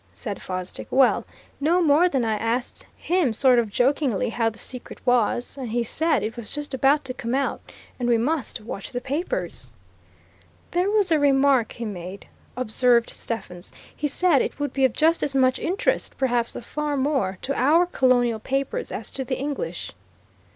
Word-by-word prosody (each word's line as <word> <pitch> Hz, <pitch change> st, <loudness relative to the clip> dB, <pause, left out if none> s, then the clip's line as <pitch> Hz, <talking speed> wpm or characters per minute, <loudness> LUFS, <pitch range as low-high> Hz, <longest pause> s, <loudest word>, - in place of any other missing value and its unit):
said 205 Hz, -5 st, -5 dB
Fosdick. 185 Hz, 0 st, -5 dB
"Well, 265 Hz, -1 st, +3 dB, 0.3 s
no 325 Hz, +5 st, +3 dB
more 330 Hz, +1 st, +4 dB
than 265 Hz, -7 st, 0 dB
I 220 Hz, -, +1 dB
asked 230 Hz, +4 st, -2 dB
him 330 Hz, -10 st, +1 dB
sort 255 Hz, +1 st, +5 dB
of 230 Hz, -3 st, -1 dB
jokingly, 250 Hz, 0 st, +1 dB
how 230 Hz, 0 st, +1 dB
the 225 Hz, -, -13 dB
secret 250 Hz, +1 st, -4 dB
was. 245 Hz, +1 st, +1 dB
And 255 Hz, -3 st, -4 dB
he 235 Hz, +2 st, 0 dB
said 315 Hz, 0 st, +1 dB
it 220 Hz, +2 st, -3 dB
was 235 Hz, -4 st, -6 dB
just 295 Hz, -1 st, -6 dB
about 275 Hz, +2 st, +3 dB
to 255 Hz, -, -4 dB
come 245 Hz, -1 st, -3 dB
out, 275 Hz, 0 st, -1 dB, 0.4 s
and 245 Hz, -1 st, 0 dB
we 235 Hz, -, +4 dB
must 270 Hz, +1 st, -1 dB
watch 205 Hz, -2 st, -7 dB
the 245 Hz, -, -2 dB
papers." 285 Hz, +8 st, -4 dB, 1.0 s
"There 360 Hz, +3 st, +1 dB
was 410 Hz, -4 st, +2 dB
a 315 Hz, -, +4 dB
remark 275 Hz, -4 st, +3 dB
he 235 Hz, -, -6 dB
made," 190 Hz, -1 st, -7 dB, 0.3 s
observed 245 Hz, 0 st, +2 dB
Stephens. 190 Hz, -6 st, -6 dB, 0.2 s
"He 300 Hz, -, -1 dB
said 305 Hz, 0 st, +3 dB
it -, -, -3 dB
would 290 Hz, 0 st, -2 dB
be 270 Hz, -1 st, +3 dB
of 255 Hz, -, +1 dB
just 325 Hz, +2 st, +3 dB
as 275 Hz, -, -1 dB
much 260 Hz, -1 st, +3 dB
interest, 365 Hz, +5 st, -1 dB
perhaps 240 Hz, -3 st, 0 dB
of 235 Hz, -, -7 dB
far 295 Hz, +1 st, -2 dB
more, 265 Hz, -9 st, 0 dB
to 275 Hz, -, -1 dB
our 305 Hz, +7 st, +4 dB
Colonial 245 Hz, -8 st, +2 dB
papers 275 Hz, -, -2 dB
as -, -, -5 dB
to 270 Hz, -, -3 dB
the 255 Hz, 0 st, -3 dB
English." 290 Hz, -, -4 dB
260 Hz, 180 wpm, -24 LUFS, 230-290 Hz, 1.0 s, sort